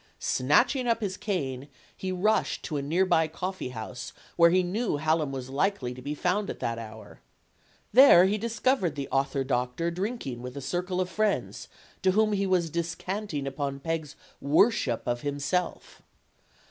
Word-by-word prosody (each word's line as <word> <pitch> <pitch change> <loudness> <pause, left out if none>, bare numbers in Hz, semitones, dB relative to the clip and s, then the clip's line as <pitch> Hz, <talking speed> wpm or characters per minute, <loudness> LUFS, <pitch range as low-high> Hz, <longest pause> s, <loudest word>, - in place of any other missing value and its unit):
Snatching 245 - +2
up 230 -1 +2
his 200 -4 -3
cane, 140 -10 -3 0.3
he 190 - -4
rushed 200 +4 +1
to 155 - -4
a 145 - 0
near 165 +7 +1
by 160 -3 +3
coffeehouse 130 - -6 0.2
where 170 -1 +6
he 185 +2 +3
knew 200 -1 -1
Hallam 155 -1 +1
was 130 -1 -6
likely 140 -4 0
to 125 - -10
be 145 +3 -4
found 190 +6 0
at - - -4
that 115 0 -2
hour. 110 -1 -10 0.7
There 240 -8 +8
he 205 +3 +1
discovered 225 - 0
the 140 -2 -4
author 135 0 0
doctor 130 +5 -1
drinking 180 - -4
with 125 +2 -7
a - - -2
circle 180 +6 -2
of 185 - -1
friends, 210 +2 -1 0.3
to 185 -1 +3
whom 215 +1 +3
he 200 -1 0
was 175 -4 +1
descanting 170 -1 -3
upon 140 0 -3
Peg's 160 -1 -3 0.3
worship 145 - +2
of 120 0 -1
himself. 145 +5 -3
165 Hz, 160 wpm, -27 LUFS, 135-195 Hz, 0.7 s, There